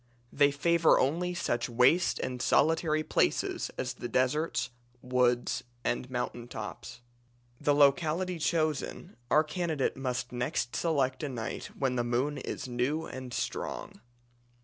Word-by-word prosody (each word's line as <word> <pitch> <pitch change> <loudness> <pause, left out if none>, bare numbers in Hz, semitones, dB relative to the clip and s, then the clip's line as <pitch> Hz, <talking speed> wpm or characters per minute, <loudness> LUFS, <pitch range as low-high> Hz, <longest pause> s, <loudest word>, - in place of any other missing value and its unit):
They 145 0 +5
favour 165 +3 +3
only 175 +7 0
such 120 -8 -1
waste 125 +9 +4
and 125 -1 -3
solitary 155 +1 +3
places - - +1
as 125 -1 -2
the 120 - -6
deserts, 130 +7 0 0.3
woods, 125 -1 +1 0.2
and 125 +1 -1
mountain 120 -1 -3
tops. 120 +2 -7 0.6
The 145 - +2
locality 160 +5 +3
chosen, 155 -3 -1
our 155 - +5
candidate 160 -3 -1
must 125 -2 -3
next 125 0 -2
select 135 -6 +1
a 150 - -2
night 120 -4 -4
when 130 -2 0
the 120 - +1
moon 125 +5 0
is - - -5
new 130 +6 -1
and 130 -1 -7
strong. 105 - -4
135 Hz, 130 wpm, -30 LUFS, 125-155 Hz, 0.6 s, They